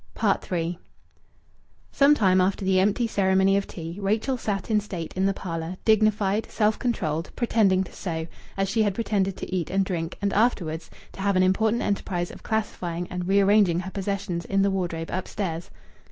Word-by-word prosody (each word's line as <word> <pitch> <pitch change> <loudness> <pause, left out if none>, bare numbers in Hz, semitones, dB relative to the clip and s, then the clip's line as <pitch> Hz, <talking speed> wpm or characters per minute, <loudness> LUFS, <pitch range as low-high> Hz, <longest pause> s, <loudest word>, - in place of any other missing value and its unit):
III 170 -1 -1 1.1
Some 285 +1 +5
time 185 -6 +4
after 190 +1 0
the 190 0 +3
empty 210 +5 +2
ceremony 190 -2 +3
of 200 0 0
tea, 170 +2 -7
Rachel 215 +7 0
sat 210 -3 -3
in 215 - +4
state 185 -6 -6
in 190 +1 +1
the - - +3
parlour, 165 0 -5
dignified, 215 -1 +2
self 215 -1 +1
controlled, 165 -9 -1
pretending 205 -6 +2
to 185 - -12
sew, 160 -3 -4 0.3
as 195 0 +1
she 220 +3 +1
had 205 -3 +1
pretended 195 -4 0
to 185 - -4
eat 175 -4 -2
and 195 0 +1
drink 170 -3 -3
and, 200 -1 -1
afterwards, 175 -8 0 0.2
to - - -9
have 200 0 +1
an 185 - +4
important 220 +5 +2
enterprise 180 -3 -2
of - - -12
classifying 180 -5 -2
and 180 0 -3
rearranging 195 -2 +4
her 190 +1 -7
possessions 195 -3 -3
in 195 0 +1
the 200 - +2
wardrobe 170 -4 -3
upstairs. 180 -2 -3
195 Hz, 175 wpm, -25 LUFS, 180-210 Hz, 1.1 s, Some